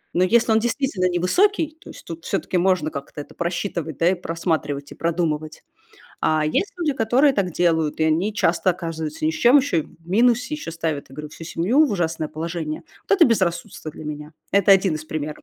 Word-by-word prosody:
но 180 - +4
если 225 +4 +3
он 220 - +5
действительно 230 -6 0
невысокий, 310 - +1
то - - -13
есть, - - -12
тут 165 0 -8
все-таки 190 -1 -1
можно 180 -3 +2
как-то 140 +1 -7
это - - -13
просчитывать, 170 -3 -3
да, 170 +1 +4
и - - 0
просматривать 160 -5 -3
и - - -17
продумывать. 160 -2 -2 0.6
А, 155 -1 +2
есть 375 - 0
люди, 315 -4 +1
которые 260 +5 +3
так 190 -3 0
делают, 160 -3 +1
и - - +4
они 165 +7 +1
часто 180 0 +2
оказываются 160 -3 -4
ни - - +3
с - - -6
чем, 245 +4 +5
еще 260 -11 +1
и - - -4
в 165 +3 -20
минусе, 245 +7 +2
еще 295 - -6
ставят, 160 -3 -3
я 135 - -12
говорю, 150 0 -6
всю 165 - -10
семью 210 - +2
в - - -4
ужасное 165 -4 -1
положение. 160 0 -4 0.3
Вот 400 - +4
это 355 - +7
безрассудство 175 -7 -1
для 155 - -11
меня. 150 +1 -7 0.2
Это 200 0 +4
один 190 -4 +3
из 155 - -6
примеров. 155 -1 -5
170 Hz, 205 wpm, -22 LUFS, 155-210 Hz, 0.6 s, это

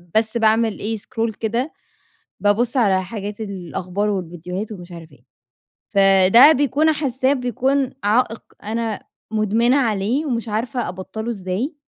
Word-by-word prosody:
بس 220 +1 +2
باعمل 220 -1 +2
إيه، 220 +2 -2
سكرول 225 +2 -3
كده، 235 +8 -2 0.7
بابصّ 225 +5 +1
على 195 -6 +3
حاجات 205 +1 -6
الأخبار 195 0 -3
والفيديوهات 180 +2 -4
ومش 175 -3 -10
عارف 165 -1 -11
إيه. 120 - -21 0.6
فده 195 +8 +6
بيكون 290 +3 +2
حاسّاه 265 -2 0
بيكون 260 +1 0
عائق 225 +2 +1 0.2
أنا 225 +1 -3 0.3
مدمنة 220 +4 +2
عليه 235 +4 0
ومش 235 -3 -2
عارفة 235 +2 -2
أبطَّله 190 +5 -5
إزاي. 205 - -3
220 Hz, 125 wpm, -21 LUFS, 195-245 Hz, 0.7 s, فده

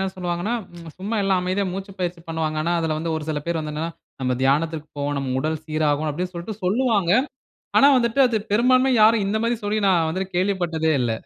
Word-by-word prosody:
என்ன 190 - 0
சொல்வாங்கன்னா, 180 +4 -2 0.4
சும்மா 205 +4 -3
எல்லாம் 190 -2 +2
அமைதியா 185 +2 -1
மூச்சு 195 +1 -6
பயிற்சி 175 -1 -3
பண்ணுவாங்க. 160 -1 -2
ஆனா 170 - 0
அதுல 160 -2 -1
வந்து 165 +1 -2
ஒரு 155 - -5
சில 150 -1 -1
பேர் 170 -1 -1
வந்து 155 -1 -5
என்னனா, 165 +2 -3 0.3
"நம்ப 125 -1 +1
தியானத்திற்கு 155 +3 +1
போவோம் 145 0 -1
நம் 135 -1 -3
உடல் 155 +1 -2
சீராகும்." 155 -1 0
அப்டீன்னுட்டு 180 +4 -4
சொல்லிட்டு 195 +4 -7
சொல்லுவாங்க. 205 -2 +2 0.7
ஆனா 275 - +7
வந்துட்டு 235 +2 +1
அது 240 -2 0 0.2
பெரும்பான்மையாக 255 +2 +4
யாரும் 215 -1 +5
இந்த 210 +2 0
மாரி 235 0 +1
சொல்லி 210 +1 0
நான் 170 -4 +3
வந்துட்டு 185 +2 -4
கேள்விப்பட்டதே 175 -4 0
இல்ல. 120 -2 0
175 Hz, 195 wpm, -23 LUFS, 155-205 Hz, 0.7 s, ஆனா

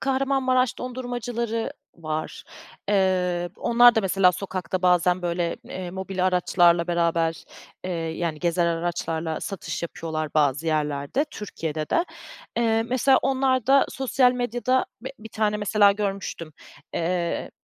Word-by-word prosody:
Kahramanmaraş 265 -2 +1
dondurmacıları 240 -2 -3 0.2
var. 155 -1 -5 0.4
Eee, 180 -3 +1
onlar 240 0 +5
da 220 - +3
mesela 190 -2 +3
sokakta 185 0 -4
bazen, 180 0 +3
böyle, 170 0 -1
eee, 180 -1 -6
mobil 190 0 -2
araçlarla 175 -1 +3
beraber, 170 -1 0 0.4
eee, 185 - -3
yani, 165 -1 -3
gezer 170 +1 +1
araçlarla 165 -1 -2
satış 195 -3 -5
yapıyorlar 160 -2 -4
bazı 145 +1 +2
yerlerde, 150 - 0
Türkiye'de 160 -7 -5
de. 335 - +2 0.5
Eee, 225 -1 +2
mesela, 255 +3 +3
onlarda 265 0 +3
sosyal 260 -1 +2
medyada, 245 +1 0
b 260 +3 -6
bir 220 +1 -10
tane, 215 -1 0
mesela, 205 -1 +4
görmüştüm, 195 -6 -4 0.4
eee, 170 0 -1
185 Hz, 120 wpm, -24 LUFS, 170-235 Hz, 0.5 s, onlar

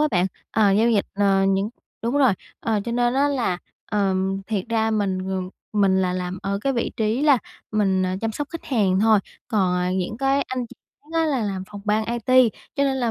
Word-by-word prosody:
á 305 - +3
bạn. 180 -1 +2 0.2
Ờ, 210 -2 +3
giao 225 +4 +4
dịch, 205 -3 +2
ờ, 195 -1 +3
những 195 +2 +1 0.3
đúng 235 +4 0
rồi, 265 -6 +5 0.3
ờ, 220 -2 0
cho 235 - -3
nên 240 +1 +1
á 280 +2 +3
là, 240 -10 0 0.3
ờm, 195 -1 0
thiệt 205 -4 -1
ra 225 -1 +1
mình, 200 -3 0
ừm, 185 -1 -2 0.2
mình 195 -2 +3
là 180 -1 0
làm 180 0 -3
ở 200 0 -1
cái 275 +5 0
vị 235 -3 -1
trí 220 +4 0
là 290 -4 +5 0.3
mình, 195 -3 +2
à, 185 - -1
chăm 225 0 -1
sóc 290 +6 -4
khách 330 - -7
hàng 195 -7 +2
thôi, 220 -1 +5 0.3
còn, 190 -5 +2
à, 180 0 0
những 185 +3 -2
cái 275 +1 +2
anh 255 -2 -3
chị - - -15 0.3
khác 295 - -25
á 325 - +3
là 275 -5 0
làm 195 -3 -2
phòng 205 -1 -8
ban 215 +1 +1
IT, 240 +2 +4 0.3
cho 280 - +3
nên 270 -1 +1
là 240 -3 0
215 Hz, 230 wpm, -23 LUFS, 195-245 Hz, 0.3 s, rồi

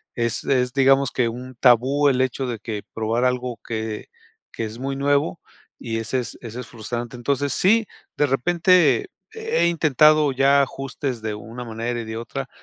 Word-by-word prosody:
es 115 -2 -1
es, 125 -2 +1
digamos 135 0 +4
que 120 -3 +1
un 125 +2 -8
tabú 130 +4 +4
el 130 -2 +1
hecho 130 +1 -1
de 120 -3 -4
que 105 -1 -5
probar 115 +2 -1
algo 125 -2 -1
que 110 -1 -4 0.4
que 115 - -4
es 110 +2 -8
muy 135 +1 -3
nuevo 140 -9 +1 0.4
y 115 -1 -3
es 115 +2 -6
es 125 -2 -2
eso 115 0 -7
es 115 - -10
frustrante. 120 +1 -5
Entonces 140 +2 -1
sí, 220 +3 +3 0.3
de 145 - +3
repente 175 - +3 0.2
he 445 - 0
intentado 155 -2 +4
ya 135 +2 +4
ajustes 135 -2 -4
de 110 -1 -3
una 115 +4 -8
manera 115 +1 -3
y - - -7
de 110 0 -5
otra 135 +3 -5
125 Hz, 175 wpm, -22 LUFS, 115-140 Hz, 0.4 s, digamos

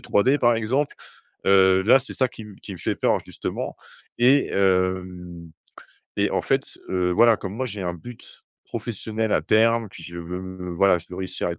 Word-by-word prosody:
3D», 130 +8 +2
par 120 -3 +4
exemple. 130 +6 -1 0.5
Heu, 95 -1 +5
là 115 +7 +6
c’est 125 - -6
ça 130 - +2
qui - - -13
m 105 -2 -11
qui 100 - -8
me 90 - -9
fait - - -2
peur - - +2
justement. - - -5 0.4
Et 130 +4 +4
hem 90 -3 -1 0.7
et - - +2
en - - 0
fait, - - -1
heu, 90 -1 0
voilà, 115 +3 +5
comme 95 +1 -6
moi 130 - -2
j’ai 105 -5 -5
un 90 -1 -2
but 110 +8 -13 0.2
professionnel 110 -1 -3
à - - +2
terme, 115 +1 +3
puis 85 - -12
je 85 0 -9
veux 90 +1 -6
voilà 95 0 +4
je 85 - -14
veux 90 - -7
réussir 95 -1 -3
à - - -2
être 85 - -9
95 Hz, 195 wpm, -23 LUFS, 90-115 Hz, 0.7 s, là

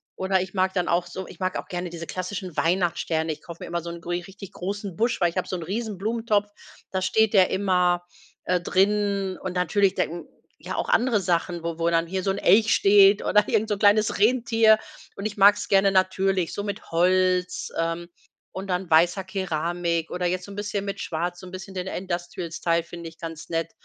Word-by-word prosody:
oder 190 0 +1
ich 185 0 -6
mag 190 0 +1
dann 180 -2 0
auch 175 +1 +1
so 185 +1 -7
ich - - -13
mag 185 0 -1
auch - - -9
gerne 175 0 -4
diese 170 -1 -8
klassischen 185 -1 -5
Weihnachtssterne. 165 -2 0
Ich - - -14
kaufe 170 -1 -11
mir - - -6
immer 170 0 -2
so 170 - -7
'n 170 0 -7
gri 175 +1 -3
richtig 195 +1 -12
großen 195 0 -5
Busch, 230 +4 0
weil 175 -2 +3
ich 185 - -10
habe 185 - -2
so 185 - -2
'n 170 - -6
riesen 210 +2 -4
Blumentopf, 215 0 0 0.4
da 190 -1 -1
steht 220 +3 +2
der 190 -2 +5
immer, 180 -2 +1 0.4
äh, 180 -1 +1
drin 195 0 +1
und 185 - -4
natürlich 190 +2 +2
den 170 +1 -2 0.4
ja, - - -4
auch - - -2
andere 235 -3 +3
Sachen, 170 -1 -1
wo 170 0 -4
wo 165 0 +2
dann 165 0 +2
hier 190 +2 -3
so 195 - -1
'n 195 - 0
Elch 215 +4 +4
steht 200 0 +6
oder 210 0 +3
irgend 215 +1 +1
so 210 - 0
'n 200 - -4
kleines 210 0 +3
Rentier. 225 -1 +4 0.4
Und 200 - -6
ich 210 - -3
mag's 205 +1 +5
gerne 195 0 +5
natürlich, 190 -1 +1
so 205 - -3
mit 205 -3 -6
Holz, 180 +1 +1
ähm, 165 +1 -2 0.4
und 190 +1 -6
dann 180 0 -1
weißer 175 +4 +3
Keramik 170 -3 -2
oder 180 0 -1
jetzt 185 +1 -2
so 200 - -11
'n - - -9
bisschen 205 -1 -3
mit 200 0 -4
Schwarz 175 +2 -3
so 185 - -10
'n - - -11
bisschen 190 +1 -8
den 185 0 -4
Industrial-Style 175 -2 -2
finde 170 -1 -8
ich 165 - -20
ganz 165 -1 -8
nett. 165 0 -2
185 Hz, 215 wpm, -25 LUFS, 175-200 Hz, 0.4 s, steht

